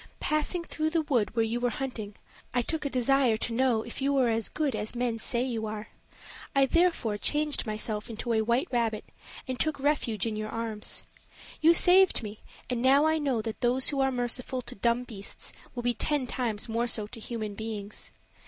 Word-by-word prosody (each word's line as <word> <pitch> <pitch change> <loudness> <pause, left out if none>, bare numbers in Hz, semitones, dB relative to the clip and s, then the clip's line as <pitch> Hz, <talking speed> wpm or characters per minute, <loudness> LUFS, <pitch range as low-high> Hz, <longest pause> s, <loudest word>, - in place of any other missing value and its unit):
"Passing 305 +3 0
through 315 -1 -1
the 325 0 +1
wood 240 -7 0
where 225 -1 +3
you 230 +2 -1
were 245 0 +1
hunting, 235 -6 -5 0.4
I 245 - +3
took 315 +4 -2
a - - +1
desire 255 -2 +3
to 230 - -3
know 240 -2 +2
if 235 - -7
you 275 +1 +2
were 260 -3 +3
as 225 -1 0
good 295 -6 -1
as 215 +2 -4
men 240 -2 -1
say 240 +2 +1
you 230 -4 -2
are 215 0 -6 0.7
I 275 0 +6
therefore 270 -10 +2
changed 295 +1 +1
myself 215 0 -3
into 230 +1 -2
a 220 - +3
white 235 +8 +1
rabbit 230 -3 0 0.4
and 255 -1 -3
took 310 -2 0
refuge 265 -8 0
in 225 -2 -2
your 215 0 -3
arms. 225 -2 -3 0.6
You 330 +2 +7
saved 370 -5 +6
me 210 0 -7 0.3
and 245 -2 -1
now 275 +4 +5
I 315 0 +3
know 265 -7 0
that 225 -1 -5
those 250 +1 +2
who 280 - -1
are 270 0 +3
merciful 250 +1 -1
to - - -7
dum 235 +4 +1
beasts 205 -5 -6 0.2
will 240 - -4
be 245 0 +2
ten 290 +3 0
times 235 -4 -1
more 230 +1 0
so 220 -3 0
to 225 +3 -10
human 220 -2 -4
beings. 210 -1 -5
240 Hz, 200 wpm, -29 LUFS, 220-275 Hz, 0.7 s, You